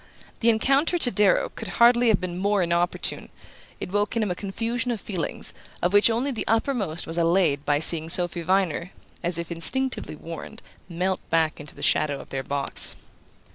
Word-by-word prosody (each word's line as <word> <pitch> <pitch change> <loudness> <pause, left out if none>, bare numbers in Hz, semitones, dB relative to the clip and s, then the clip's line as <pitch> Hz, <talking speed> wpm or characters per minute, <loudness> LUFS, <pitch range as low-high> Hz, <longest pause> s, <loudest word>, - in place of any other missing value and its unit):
The 235 - +2
encounter, 275 +9 +2
to 250 -7 +3
Darrow, 205 -3 +2
could 225 - -8
hardly 240 +1 +5
have 220 - +3
been 180 -1 -5
more 200 0 +1
inopportune; 170 +1 0 0.5
it - - -6
woke 205 +2 -1
in 230 - +1
him 205 - -2
a - - -3
confusion 230 +5 -3
of 235 -3 -2
feelings 185 -6 -3 0.3
of 175 +2 -1
which 205 +2 +6
only 240 +5 -1
the 235 - -5
uppermost 225 - -1
was 165 +1 -4
allayed 165 -4 +1
by 145 - +2
seeing 160 +1 +7
Sophy 175 0 -1
Viner, 180 0 -1 0.3
as 175 -1 0
if 170 0 -6
instinctively 255 +5 -1
warned, 165 +2 -10 0.3
melt 185 +2 -2
back 160 -1 0
into 150 -1 -10
the - - -8
shadow 145 -2 +1
of - - -13
their 135 - -3
box. 140 +1 +1
185 Hz, 180 wpm, -24 LUFS, 165-225 Hz, 0.5 s, seeing